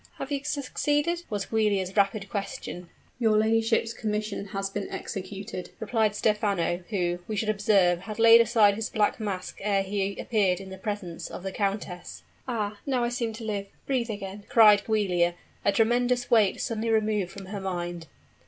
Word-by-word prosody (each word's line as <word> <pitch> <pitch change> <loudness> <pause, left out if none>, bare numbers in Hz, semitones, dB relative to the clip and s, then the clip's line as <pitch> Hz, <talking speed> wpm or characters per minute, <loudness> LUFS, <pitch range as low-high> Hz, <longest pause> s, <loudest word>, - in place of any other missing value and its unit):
"Have 270 - -6
you 280 -1 -1
succeeded?" 295 +4 -1
was 205 -3 -2
Giulia's 200 -4 0
rapid 200 0 +2
question. 190 -3 -5 0.3
"Your 220 -3 +3
ladyship's 225 +1 +2
commission 210 -2 -3
has 195 0 -3
been 195 0 -5
executed," 190 -1 -6
replied 220 -1 +1
Stephano, 200 -5 0
who, 175 -4 -1
we 215 - -3
should 215 +1 -1
observe, 195 -4 +3
had 215 +3 -7
laid 230 0 +8
aside 220 -3 +4
his 215 +1 -3
black 210 +2 +1
mask 195 -4 -4
ere 195 -1 +1
he 195 0 -2
appeared 195 -5 +1
in 190 -1 -9
the 190 - -8
presence 190 -5 -5
of - - -8
the 195 - -3
countess. 195 -3 -3 0.2
"Ah! 210 -4 -2
now 255 -3 +1
I 240 - +1
seem 240 -2 -2
to 225 +1 -8
live 205 -2 -3 0.2
breathe 250 -4 0
again!" 205 -1 -6
cried 215 -5 +7
Giulia, 180 -6 +2 0.3
a - - +4
tremendous 245 +3 +2
weight 215 -5 +4
suddenly 230 -1 -2
removed 215 -4 +1
from 195 -1 -9
her 200 +1 -6
mind. 175 -3 -4
210 Hz, 170 wpm, -27 LUFS, 195-225 Hz, 0.3 s, laid